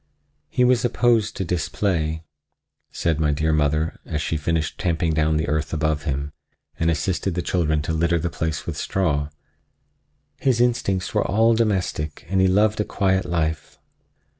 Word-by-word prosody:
"He 125 Hz, -, +1 dB
was 125 Hz, -1 st, +3 dB
opposed 115 Hz, -2 st, +2 dB
to 95 Hz, -, -2 dB
display," 80 Hz, -1 st, -1 dB, 0.7 s
said 80 Hz, -2 st, -1 dB
my 75 Hz, -1 st, +2 dB
dear 80 Hz, +2 st, +1 dB
mother, 75 Hz, +1 st, 0 dB
as 75 Hz, -, -3 dB
she 75 Hz, -, -2 dB
finished 80 Hz, +1 st, -1 dB
tamping 85 Hz, -2 st, 0 dB
down 80 Hz, 0 st, +2 dB
the 80 Hz, -, -1 dB
earth 75 Hz, 0 st, -1 dB
above 80 Hz, -2 st, 0 dB
him 70 Hz, 0 st, -2 dB, 0.5 s
and 80 Hz, -, +2 dB
assisted 90 Hz, +2 st, -1 dB
the 90 Hz, -, -1 dB
children 80 Hz, -4 st, 0 dB
to 80 Hz, -, -2 dB
litter 85 Hz, +1 st, +2 dB
the 85 Hz, +1 st, -2 dB
place 80 Hz, -2 st, -3 dB
with -, -, -4 dB
straw; 75 Hz, -6 st, 0 dB, 1.1 s
"his 130 Hz, -3 st, +2 dB
instincts 115 Hz, -7 st, +1 dB
were -, -, +2 dB
all 115 Hz, +4 st, +4 dB
domestic 95 Hz, -9 st, -1 dB
and 95 Hz, 0 st, +2 dB
he 95 Hz, -, +5 dB
loved 105 Hz, +3 st, +3 dB
a -, -, +1 dB
quiet 95 Hz, -2 st, 0 dB
life." 80 Hz, -3 st, -2 dB
85 Hz, 165 wpm, -23 LUFS, 75-95 Hz, 1.1 s, he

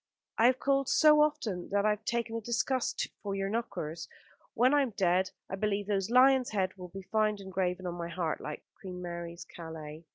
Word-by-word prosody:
I 230 Hz, -, +7 dB
have 255 Hz, 0 st, +3 dB
called 275 Hz, 0 st, +1 dB
so 300 Hz, -1 st, +6 dB
often 215 Hz, -12 st, 0 dB
that 200 Hz, +1 st, +1 dB
I 215 Hz, -, +5 dB
have 210 Hz, 0 st, -4 dB
taken 235 Hz, -1 st, -1 dB
a 230 Hz, -, -2 dB
disgust 240 Hz, +3 st, 0 dB
for 200 Hz, -1 st, -3 dB
your 195 Hz, 0 st, -1 dB
knockers. 195 Hz, -8 st, -4 dB, 0.5 s
When 250 Hz, +4 st, +4 dB
I 290 Hz, -, +5 dB
am 245 Hz, -7 st, -2 dB
dead 185 Hz, -1 st, +2 dB, 0.2 s
I 190 Hz, -, -4 dB
believe 205 Hz, 0 st, -1 dB
those 195 Hz, -1 st, 0 dB
lions' 255 Hz, +1 st, +5 dB
heads 190 Hz, -3 st, -1 dB
will 180 Hz, -2 st, -8 dB
be 195 Hz, +2 st, -9 dB
found 215 Hz, +1 st, +1 dB
engraven 185 Hz, -1 st, -2 dB
on 175 Hz, -, -2 dB
my 170 Hz, -1 st, -5 dB
heart, 170 Hz, -2 st, -2 dB
like 150 Hz, -, -6 dB, 0.2 s
Queen 180 Hz, -2 st, -7 dB
Mary's 170 Hz, -1 st, -6 dB
Calais." 160 Hz, -2 st, -9 dB
195 Hz, 200 wpm, -31 LUFS, 180-235 Hz, 0.5 s, I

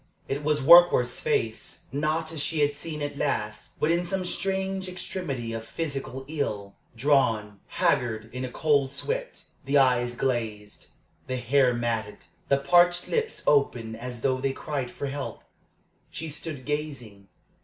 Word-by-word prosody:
It 140 Hz, +2 st, -3 dB
was 150 Hz, 0 st, +1 dB
Warkworth's 165 Hz, -5 st, +7 dB
face, 110 Hz, 0 st, -2 dB
not 155 Hz, +3 st, -1 dB
as 160 Hz, -3 st, -4 dB
she 155 Hz, +1 st, 0 dB
had 145 Hz, 0 st, +3 dB
seen 150 Hz, 0 st, -5 dB
it 145 Hz, -1 st, -4 dB
last, 105 Hz, -6 st, -3 dB
but 150 Hz, -, +2 dB
in 170 Hz, +1 st, +2 dB
some 185 Hz, +1 st, -2 dB
strange 190 Hz, 0 st, -2 dB
extremity 160 Hz, -10 st, -4 dB
of 115 Hz, 0 st, -4 dB
physical 135 Hz, -1 st, -5 dB
ill 105 Hz, -10 st, -3 dB, 0.2 s
drawn, 115 Hz, -6 st, +2 dB
haggard, 120 Hz, -11 st, 0 dB
in 125 Hz, +1 st, -4 dB
a 130 Hz, -, -3 dB
cold 140 Hz, -3 st, +2 dB
sweat -, -, -3 dB, 0.2 s
the 140 Hz, +2 st, +2 dB
eyes 125 Hz, -2 st, +3 dB
glazed, 110 Hz, -5 st, -2 dB, 0.4 s
the 130 Hz, 0 st, -2 dB
hair 125 Hz, +1 st, +3 dB
matted, 115 Hz, -3 st, -3 dB, 0.2 s
the 140 Hz, -, +5 dB
parched 175 Hz, +4 st, +4 dB
lips 455 Hz, -1 st, -1 dB
open 120 Hz, -6 st, +2 dB
as 120 Hz, 0 st, -7 dB
though 130 Hz, 0 st, +1 dB
they 135 Hz, 0 st, 0 dB
cried 135 Hz, -3 st, -3 dB
for 140 Hz, -, -6 dB
help. 140 Hz, 0 st, -5 dB, 0.7 s
She 160 Hz, -, -5 dB
stood 150 Hz, -3 st, -5 dB
gazing. 135 Hz, -10 st, -4 dB
140 Hz, 150 wpm, -27 LUFS, 120-160 Hz, 0.7 s, Warkworth's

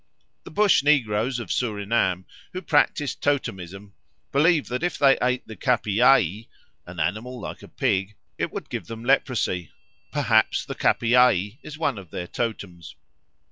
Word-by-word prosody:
The -, -, -9 dB
Bush 205 Hz, +2 st, +3 dB
negroes 125 Hz, -4 st, +1 dB
of 115 Hz, -7 st, -6 dB
Surinam, 100 Hz, -5 st, 0 dB, 0.3 s
who 185 Hz, +1 st, -5 dB
practise 145 Hz, -3 st, +1 dB
totemism, 100 Hz, -8 st, -3 dB, 0.4 s
believe 155 Hz, +2 st, +3 dB
that 125 Hz, +3 st, -3 dB
if 175 Hz, 0 st, -1 dB
they 135 Hz, -2 st, +5 dB
ate 125 Hz, 0 st, 0 dB
the 110 Hz, -, -9 dB
capiaï 115 Hz, -4 st, +2 dB, 0.4 s
(an 85 Hz, 0 st, -9 dB
animal 110 Hz, +10 st, -2 dB
like -, -, -7 dB
a -, -, -12 dB
pig) 95 Hz, +2 st, -1 dB, 0.2 s
it -, -, -1 dB
would -, -, -7 dB
give -, -, -5 dB
them 115 Hz, 0 st, -8 dB
leprosy; 120 Hz, -, +1 dB, 0.4 s
perhaps -, -, +2 dB
the -, -, -5 dB
capiaï 120 Hz, -, +2 dB
is 150 Hz, -, -9 dB
one 145 Hz, -8 st, -1 dB
of 95 Hz, -4 st, -13 dB
their 90 Hz, -, -5 dB
totems. 90 Hz, -6 st, -5 dB
115 Hz, 145 wpm, -24 LUFS, 100-135 Hz, 0.4 s, they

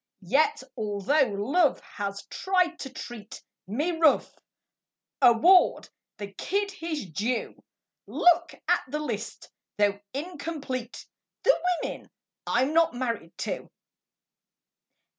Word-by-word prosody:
Yet 295 Hz, -, +2 dB
although 215 Hz, +7 st, +1 dB
Love 285 Hz, -, +2 dB
has 200 Hz, -1 st, -5 dB
tried 365 Hz, -3 st, 0 dB
to 270 Hz, -, -5 dB
treat 240 Hz, -4 st, -9 dB, 0.3 s
Me 290 Hz, -, -1 dB
rough, 320 Hz, -3 st, +3 dB, 0.9 s
award 265 Hz, +10 st, +5 dB, 0.3 s
the 200 Hz, -1 st, -7 dB
kid 400 Hz, -, -1 dB
his 330 Hz, -, -4 dB
due. 215 Hz, +8 st, -3 dB, 0.4 s
Look 350 Hz, -1 st, +3 dB
at -, -, +3 dB
the 295 Hz, -, -3 dB
list, 300 Hz, 0 st, -5 dB, 0.3 s
though 205 Hz, -1 st, +2 dB
incomplete: 285 Hz, -5 st, -5 dB, 0.4 s
The -, -, +6 dB, 0.3 s
women -, -, -6 dB, 0.4 s
I'm 260 Hz, +5 st, +2 dB
not 330 Hz, -4 st, +3 dB
married 230 Hz, -9 st, -3 dB
to. -, -, -4 dB
275 Hz, 105 wpm, -27 LUFS, 220-330 Hz, 0.9 s, The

